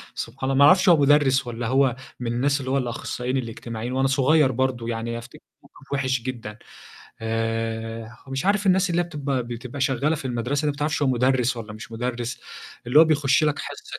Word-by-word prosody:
سبحان 130 +3 -4
ال 135 - +1
ما 140 - +7
أعرفش 185 +4 +6
هو 170 - +7
مدرس 140 -2 +4
والّا 120 -1 -4
هو 130 -1 +3 0.2
من 120 -1 -2
الناس 140 +4 +1
اللي 130 0 -4
هو 140 - +2
الأخصائيين 125 0 -3
الإجتماعيين 115 0 -5
وأنا 135 +1 +2
صغيّر 135 +1 +3
برضه 125 -2 -1
يعني 115 +1 -3
أفتكّر 120 +1 -11 0.2
موقِف - - -12
وِحش 130 -2 0
جدًا 115 -4 -6 0.6
آآ 115 0 -3
ومش 135 +6 -3
عارف 205 0 +2
الناس 190 0 +3
اللي 175 +1 +2
هي 175 - -6
بتبقى 140 -5 -2
بتبقى 120 +3 -7
شغّالة 140 +3 +1
في 140 - -9
المَدرسة 125 +3 -1
اللي 150 - +1
ما 145 - -13
بتعرفش 150 0 -1
هو 140 - +3
مدرس 125 -1 +2
والّا 110 -2 -7
مش 110 +1 -10
مدرس 120 +1 -4 0.5
اللي 125 +5 +4
هو 165 - +8
بيخش 150 -1 +2
لك 150 -1 +1
حصّة. - - -7
130 Hz, 195 wpm, -24 LUFS, 115-140 Hz, 0.6 s, هو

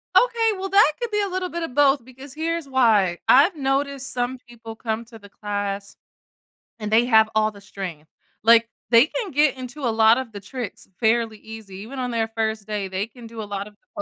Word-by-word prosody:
Okay, 470 -2 +4
well, 385 +1 -4
that 395 -4 +6
could 475 -2 -3
be 420 0 +1
a 400 - -1
little 370 0 -2
bit 340 0 -4
of 290 -6 -6
both 280 -2 +4
because 260 +2 -12
here's 330 0 -2
why, 220 -9 +3
I've 300 +8 +6
noticed 275 -1 -1
some 250 +1 -2
people 230 -2 -10
come 225 0 -3
to 225 -1 -14
the 205 -1 -15
class 205 -1 -4 0.8
and 210 -1 -4
they 230 +2 +5
have 220 -3 +5
all 215 0 +3
the 200 -1 -15
strength. 175 -6 -8 0.3
Like, 230 +1 +6 0.2
they 235 +2 +7
can 405 +4 -4
get 295 0 +3
into 255 +3 -8
a 240 -4 +1
lot 220 +1 +5
of 260 -3 -4
the 205 - -8
tricks 225 +3 -7
fairly 225 -1 +1
easy 220 -3 -10
even 235 +7 -8
on 250 -1 -2
their 225 -1 0
1st 220 -1 -2
day, 210 -2 -3
they 190 +3 -3
can 235 0 -13
do 225 -1 -8
a 210 - -5
lot 200 0 -5
of 210 - -15
the 305 +9 -9
230 Hz, 220 wpm, -23 LUFS, 215-275 Hz, 0.8 s, they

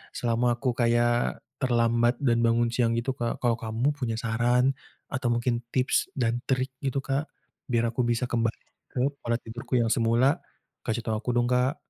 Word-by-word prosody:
selama 120 0 +1
aku 130 -2 +1
kayak 120 0 +2 0.2
terlambat 120 -1 +2
dan 120 -4 +3
bangun 115 0 +3
siang 115 -2 +2
gitu, 125 +3 -1
Kak. 120 -1 -2
Kalau 120 -1 +3
kamu 115 +6 0
punya 120 -5 -2
saran 120 +4 +2 0.4
atau 130 -3 -1
mungkin 120 0 0
tips 130 0 +1
dan 120 -1 +1
trik 130 0 0
gitu, 135 0 0
Kak? 140 +3 -1 0.4
Biar 115 -1 +2
aku 125 +1 0
bisa 120 +1 0
kembali 115 -1 -1 0.3
ke 125 - -4 0.2
pola 115 0 0
tidurku 120 +3 -5
yang 115 - +2
semula. 120 +7 +3 0.5
Kasih 115 +1 -1
tau 110 -1 0
aku 125 +3 -2
dong, 120 0 +2
Kak. 125 +4 +2
120 Hz, 170 wpm, -27 LUFS, 115-125 Hz, 0.5 s, dan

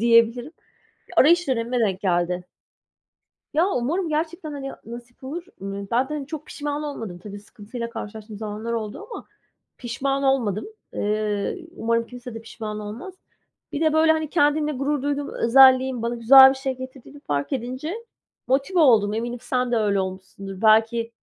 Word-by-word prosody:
diyebilirim. 235 +4 +3 0.6
Arayış 340 +2 +5
dönemime 240 0 0
denk 195 -4 0
geldi. 180 -1 0 1.1
Ya, 335 +6 +3
umarım 335 +4 -1
gerçekten, 315 +1 -3
hani, 275 -1 -5
nasip 240 +2 -11
olur. 330 +7 -5 0.2
Imm, 195 0 -5
ben 250 +3 +2
de 300 - -4
hani, 285 -3 -4
çok 305 0 -7
pişman 295 0 -4
olmadım. 225 -11 -6
Tabii, 205 +2 -9
sıkıntıyla 230 +3 -8
karşılaştığım 220 -1 -8
zamanlar 215 +2 -4
oldu 225 - -4
ama - - -8 0.5
pişman 270 +3 -2
olmadım. 240 -7 +1 0.3
Eee, 210 - -2
umarım 230 0 0
kimse 245 -1 -9
de 225 - -6
pişman 220 -2 -6
olmaz. 225 - -7 0.6
Bir 290 - -3
de 315 -1 +3
böyle, 315 0 +5
hani, 315 -2 -2
kendimle 300 -1 +2
gurur 275 +1 -1
duyduğum 285 0 -2
özelliğin 260 0 +5
bana 235 +1 -1
güzel 265 +3 +9
bir - - -1
şey 265 -1 -3
getirdiğini 260 +2 -10
fark 145 - -2
edince 260 - -3 0.5
motive 275 +8 +1
oldum. 220 -9 +5
Eminim 240 +2 -3
sen 250 -1 -1
de - - +3
öyle 205 -3 +2
olmuşsundur. 190 +1 -7
Belki, 225 +1 +3
245 Hz, 155 wpm, -23 LUFS, 215-285 Hz, 1.1 s, güzel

